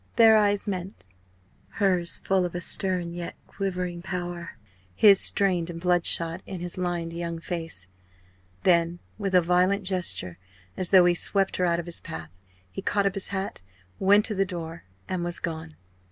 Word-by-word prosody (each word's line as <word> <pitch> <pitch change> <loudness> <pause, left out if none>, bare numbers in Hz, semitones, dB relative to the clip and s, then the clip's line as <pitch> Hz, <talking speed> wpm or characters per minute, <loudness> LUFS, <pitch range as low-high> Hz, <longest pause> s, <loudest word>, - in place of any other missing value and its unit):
Their 225 -1 +7
eyes 205 -1 +2
met 185 - -5 0.7
hers 185 -4 +1
full 190 -1 +2
of 175 -1 -4
a - - -1
certain - - -8 0.5
stern - - -8
yet 175 0 -6
quivering 180 -3 -4
power, 175 -2 -5 0.4
his 200 -2 +7
strained 180 -4 +3
and 165 -1 -6
bloodshot, 170 -1 +2
in 190 -2 -6
his 175 0 -4
lined 175 -2 -3
young 170 0 -4
face. 165 - -5 0.8
Then, 170 -1 +3 0.2
with 195 -2 -1
a 180 - +7
violent 180 +4 +2
gesture 180 - -2 0.4
as 185 -2 -1
though 185 -2 +7
he 175 - +4
swept 195 +3 +1
her 180 - +1
out 170 -1 +1
of 170 - -5
his 175 -1 -1
path 80 0 -8 0.4
he - - -6
caught 200 -1 0
up 195 - +1
his 195 -1 -1
hat, 190 - -4 0.4
went 205 +2 +5
to 215 - -2
the 195 -1 +1
door, 170 -3 -7 0.2
and 185 -2 -2
was 175 0 0
gone. 160 -1 -5
180 Hz, 175 wpm, -26 LUFS, 170-195 Hz, 0.8 s, Their